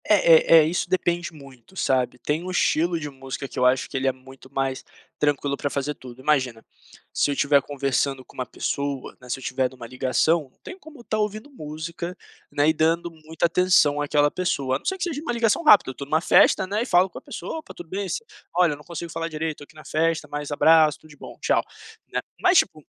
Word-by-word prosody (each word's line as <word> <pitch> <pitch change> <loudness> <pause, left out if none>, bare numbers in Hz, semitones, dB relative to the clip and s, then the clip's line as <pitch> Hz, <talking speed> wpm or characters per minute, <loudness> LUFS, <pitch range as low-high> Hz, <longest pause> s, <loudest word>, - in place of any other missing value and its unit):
É, 165 -5 +6
eh - - +9
eh, - - +2
isso 170 +2 -1
depende 175 -1 0
muito, 140 0 -16
sabe. 125 -4 0
Tem 150 +6 -2
um 185 - -6
estilo 170 -1 +1
de 150 - -5
música 135 0 -7
que 135 - -7
eu 125 - +3
acho 125 0 +2
que - - -12
ele 130 0 0
é - - +4
muito 130 0 -16
mais 135 -1 -2 0.4
tranquilo 145 -1 +1
pra 145 - -3
fazer 140 +1 -2
tudo. 125 -3 -13
Imagina, 130 -5 0 0.5
se - - +1
eu 140 - 0
tiver 140 0 +3
conversando 135 -1 -1
com - - -19
uma 130 - -3
pessoa, 140 +1 -4
né, 125 - -14
se 130 - -2
eu - - -12
tiver 130 0 0
numa 125 -2 -11
ligação, 130 +5 +1
não - - -38
tem 370 - -9
como 310 -6 -14
estar 215 -2 -3
ouvindo 215 +6 -3
música, 170 - -6 0.3
né, 145 +1 +2
e - - +3
dando 165 +2 +1
muita 160 +1 -3
atenção 170 -4 +3
àquela 145 0 +2
pessoa, 140 -8 -1
a - - -18
não - - -27
ser 380 - -1
que - - -4
seja 315 -5 -3
uma 305 - -3
ligação 235 +4 +1
rápida, 205 - +6
eu - - -11
tô 140 - -7
numa 155 +3 +1
festa, 190 - +5
né, 205 +3 -2
e - - -1
falo 180 -1 +4
com - - -10
a - - -28
pessoa 320 - -6
"Opa, 315 - -12
tudo 175 - -10
bem, 195 +1 -3
si 460 - -3 0.3
olha 175 -2 +4
eu - - -8
não 150 - -15
consigo 170 0 -7
falar 165 0 -3
direito, 155 -1 -3
tô - - -10
aqui - - -23
na 155 - -13
festa, 160 -1 0
mas 145 0 -5
abraço, 155 0 +5
tudo 155 - -17
de 145 - -16
bom, - - -11
tchau", - - +2 0.5
né. - - 0 0.2
Mas 365 0 +5
tipo 155 - +1
155 Hz, 240 wpm, -24 LUFS, 135-175 Hz, 0.5 s, eh